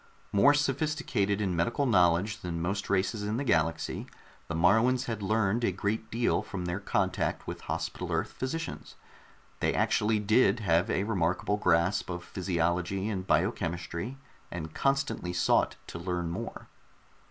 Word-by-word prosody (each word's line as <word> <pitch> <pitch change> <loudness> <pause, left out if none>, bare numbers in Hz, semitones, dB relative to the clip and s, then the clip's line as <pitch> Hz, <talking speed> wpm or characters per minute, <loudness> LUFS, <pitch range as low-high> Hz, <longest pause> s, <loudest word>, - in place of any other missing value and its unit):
More 140 +9 +5
sophisticated 140 -8 0
in 95 -3 0
medical 115 - +1
knowledge 95 -1 +3
than 85 -4 -4
most 100 +4 -2
races 100 +2 +1
in 105 +2 -1
the 140 - -1
galaxy, 80 - 0 0.4
the 85 - -3
Moruans 110 +10 +3
had 115 -3 -3
learned 110 +2 +1
a 105 - +3
great 105 +4 -2
deal 115 +1 +1
from 90 -3 -5
their 90 +2 -2
contact - - -1
with - - -6
Hospital - - -4
Earth - - -1
physicians. 160 +6 -5 0.6
They - - +1
actually 110 +1 +2
did 110 +1 +3
have 90 +1 +2
a 95 - +1
remarkable 95 -1 0
grasp 90 +1 +2
of 90 -1 -4
physiology 90 +2 -1
and 95 -3 -3
biochemistry, 85 +8 -1 0.3
and 80 -2 -6
constantly 135 -10 0
sought 90 - +2
to 85 - -7
learn 85 -1 -2
more. - - -6
100 Hz, 145 wpm, -29 LUFS, 90-110 Hz, 0.6 s, More